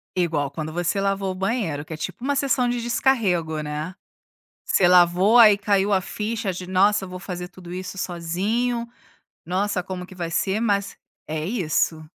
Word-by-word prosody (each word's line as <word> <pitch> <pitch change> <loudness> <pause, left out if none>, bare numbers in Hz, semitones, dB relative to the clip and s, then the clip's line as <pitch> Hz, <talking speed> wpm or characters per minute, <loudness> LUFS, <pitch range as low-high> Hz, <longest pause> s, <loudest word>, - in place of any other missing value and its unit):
Igual 160 -6 0
quando 155 +1 -5
você 175 +3 0
lavou 195 -1 0
o - - -6
banheiro, 190 - -2
que 160 - -7
é - - -6
tipo 155 +9 -6
uma 285 +2 0
sessão 265 -2 +1
de 240 0 -1
descarrego, 205 -10 +1
né. 150 +4 -4 0.7
Você 185 - +3
lavou, 180 +5 +5
aí 215 -4 +8
caiu 205 0 +1
a 195 - +4
ficha 210 0 -3
de: 180 0 -7
"Nossa, 195 +2 +3
eu - - -10
vou 185 0 -7
fazer 180 -2 -6
tudo 180 -1 -11
isso 185 +1 -6
sozinho. 205 +8 -1 0.6
Nossa, 185 +2 -1
como 180 -1 -6
que 185 - -13
vai 170 -2 -4
ser", 190 +5 0
mas 200 -3 0 0.3
é 155 0 -3
isso. 165 -5 0
185 Hz, 180 wpm, -23 LUFS, 175-210 Hz, 0.7 s, aí